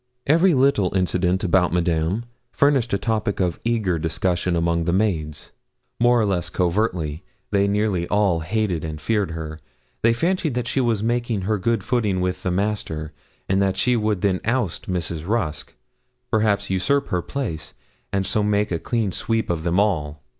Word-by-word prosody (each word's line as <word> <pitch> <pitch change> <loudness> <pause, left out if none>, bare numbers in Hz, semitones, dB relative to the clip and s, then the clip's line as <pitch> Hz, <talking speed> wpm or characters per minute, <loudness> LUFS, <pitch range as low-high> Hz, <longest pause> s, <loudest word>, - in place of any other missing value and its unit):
Every 165 +4 +4
little 130 -9 +2
incident 90 +1 +1
about 90 -1 +3
Madame 85 +5 0 0.3
furnished 140 -4 +2
a 100 - +2
topic 105 -1 -1
of 90 -3 0
eager 110 -8 0
discussion 85 +2 0
among 85 0 +1
the 85 - +1
maids. 80 -7 -1 0.5
More 120 0 +4
or 110 - +2
less 95 -4 0
covertly, 90 -4 -1 0.3
they 100 -1 +3
nearly 100 -4 0
all 100 -4 +2
hated 90 -1 -1
and 80 -1 -5
feared 105 +2 0
her. 80 -1 -6 0.4
They 115 +1 +4
fancied 165 +1 0
that 125 -1 -1
she 135 - +1
was 115 -4 +1
making 120 -2 0
good 105 +2 0
her - - -17
footing 105 -7 +1
with 90 0 -1
'the 90 - -1
Master;' 90 -5 -2 0.3
and 95 +1 +2
that 95 -1 +1
she 125 +5 +2
would 105 -4 0
then 95 -2 +1
oust 115 -8 -1
Mrs. 85 -2 -3
Rusk 95 -9 -2 0.6
perhaps 100 -2 +1
usurp 140 +10 +1
her 90 - 0
place 85 - -5 0.4
and 95 -1 0
so 105 +3 0
make 105 -1 +1
a 85 - 0
clean 115 -2 -1
sweep 110 +2 -1
of 85 -2 -2
them 85 +3 +1
all. 80 -8 0
100 Hz, 170 wpm, -22 LUFS, 85-110 Hz, 0.6 s, Every